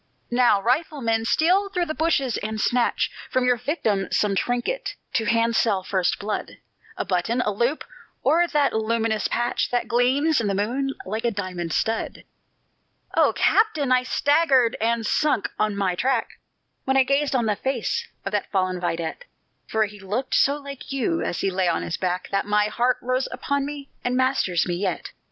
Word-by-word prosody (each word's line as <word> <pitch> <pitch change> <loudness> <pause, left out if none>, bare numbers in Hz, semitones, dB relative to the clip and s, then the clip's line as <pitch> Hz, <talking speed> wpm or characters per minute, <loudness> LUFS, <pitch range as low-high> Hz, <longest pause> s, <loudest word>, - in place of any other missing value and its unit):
"Now, 240 -4 +4
rifleman, 240 -2 0
steal 370 - +3
through 360 -2 -1
the 310 - -3
bushes, 300 -7 +1
and 215 +1 -4
snatch 245 +2 +1 0.2
From 255 -1 +1
your 250 -1 +3
victim 225 - -1
some 205 -2 +1
trinket 245 - -1 0.2
to 225 - +1
handsel 230 -3 +2
first 185 -1 0
blood; 210 +1 -4 0.4
A - - -2
button, 195 +6 0
a 210 - 0
loop, 240 +9 0 0.4
or 345 +2 +4
that 295 -4 +1
luminous 220 -1 0
patch 240 +1 -1
That 245 -1 -1
gleams 260 +5 +2
in 215 - -1
the 200 - 0
moon 260 +7 -1
like 220 +4 -3
a 240 - +2
diamond 185 -5 -4
stud!" 225 0 -1 0.9
"O - - +5
captain! 315 - +2
I 255 0 +5
staggered, 270 -2 +3
and 230 0 +1
sunk 295 -2 +1
on 215 -1 +1
my 195 -2 0
track, 250 +5 0 0.6
When 265 0 +2
I 265 - +6
gazed 275 +1 +1
on 240 -3 +2
the 210 -1 +1
face 265 0 -2 0.2
of 195 - -2
that 205 -1 -1
fallen 185 -2 0
vidette, 170 - -3 0.4
For 220 0 +1
he 205 0 -11
looked 210 +7 -3
so 280 +1 +3
like 280 -2 -9
you, 275 +5 0
as - - -2
he 195 - 0
lay 185 -1 0
on 170 - 0
his 170 - -3
back, 180 0 -2
That 195 0 0
my 210 0 +2
heart 245 +3 +1
rose 255 +1 0
upon 280 0 -1
me, 285 -1 -8
and 250 +1 0
masters 255 -10 +1
me 175 - -2
yet. 185 -2 -3
235 Hz, 180 wpm, -24 LUFS, 205-275 Hz, 0.9 s, I